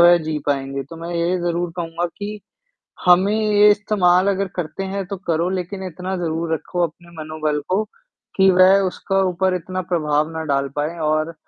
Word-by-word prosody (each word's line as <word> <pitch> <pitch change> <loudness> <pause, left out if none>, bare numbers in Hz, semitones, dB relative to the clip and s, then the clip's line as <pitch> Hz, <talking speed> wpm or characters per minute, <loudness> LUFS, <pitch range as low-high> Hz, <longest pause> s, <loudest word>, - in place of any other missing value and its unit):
वह 175 0 +8
जी 155 -1 -2
पाएँगे। 135 -1 -1
तो 165 - -8
मैं 170 +1 -5
यही 170 +2 +1
ज़रूर 175 0 -1
कहूँगा 170 0 -2
कि, 210 +1 -5 0.7
हमें 185 +3 +5
ये 210 -1 +4
इस्तेमाल 195 -3 +3
अगर 195 0 0
करते 175 +2 -4
हैं 195 0 -3
तो 200 0 -5
करो 165 +1 +1
लेकिन 190 +1 -4
इतना 185 +2 -5
ज़रूर 165 -1 -2
रखो 175 +2 -2
अपने 170 +2 -19
मनोबल 155 -1 -2
को, 190 +4 +2 0.5
कि 190 0 +5
वह 185 +1 +6
उसका 195 +1 -1
ऊपर 185 +1 0
इतना 185 +1 -4
प्रभाव 155 -2 +1
ना 160 0 -4
डाल 140 0 0
पाएँ 155 +4 -2
और 155 +2 0
175 Hz, 180 wpm, -21 LUFS, 160-190 Hz, 0.7 s, वह